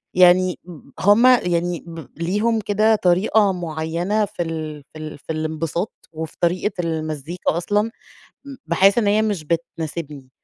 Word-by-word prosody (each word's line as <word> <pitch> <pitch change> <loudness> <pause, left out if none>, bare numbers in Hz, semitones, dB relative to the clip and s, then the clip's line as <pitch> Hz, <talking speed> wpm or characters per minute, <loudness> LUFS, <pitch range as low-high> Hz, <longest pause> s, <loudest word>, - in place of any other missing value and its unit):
يعني 180 0 +5
م 160 -6 -13
هُم 205 +5 +5
يعني 175 -8 +2
ب 165 -5 -9
ليهم 215 +6 +1
كده 215 +2 +3
طريقة 195 +2 +3
معيّنة 170 +5 -1
في 180 - -4
ال 155 -3 -5
في - - -10
ال 155 -1 -7
في 160 - -7
الانبساط 160 +4 -3 0.2
وفي 160 0 -6
طريقة 180 +4 +1
المزيكا 160 +1 -2
أصلًا، 205 +4 +1 0.6
م 275 -1 -8
باحس 195 +5 +4
إن 225 -3 +2
هي 210 +2 +3
مش 205 -7 -1
بتناسبني، 160 -4 -4
175 Hz, 145 wpm, -21 LUFS, 160-205 Hz, 0.6 s, يعني